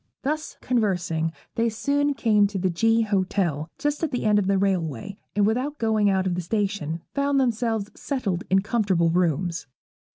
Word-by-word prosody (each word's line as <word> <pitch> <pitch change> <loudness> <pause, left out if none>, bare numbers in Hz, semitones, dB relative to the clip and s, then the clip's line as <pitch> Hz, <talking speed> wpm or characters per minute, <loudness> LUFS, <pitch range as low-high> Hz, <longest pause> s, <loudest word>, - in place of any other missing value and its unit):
Thus 305 +3 -3
conversing, 180 -9 0 0.2
they 230 0 +1
soon 285 +5 0
came 210 -6 +3
to 200 0 -5
the 185 0 0
G 225 +6 +3
Hotel 185 -7 0
just 295 0 -1
at 325 - 0
the 250 -4 -3
end 210 -1 +4
of 190 - -1
the 195 0 +3
railway, 185 - -1 0.2
and 205 -1 +3
without 255 +7 0
going 220 -2 +2
out 190 -1 +1
of 185 - 0
the 180 - -2
station 180 -4 -2
found 280 0 +1
themselves 225 -4 0
settled 205 - -2
in 190 0 +3
comfortable 195 -7 +1
rooms. 170 -1 0
205 Hz, 170 wpm, -25 LUFS, 180-230 Hz, 0.2 s, end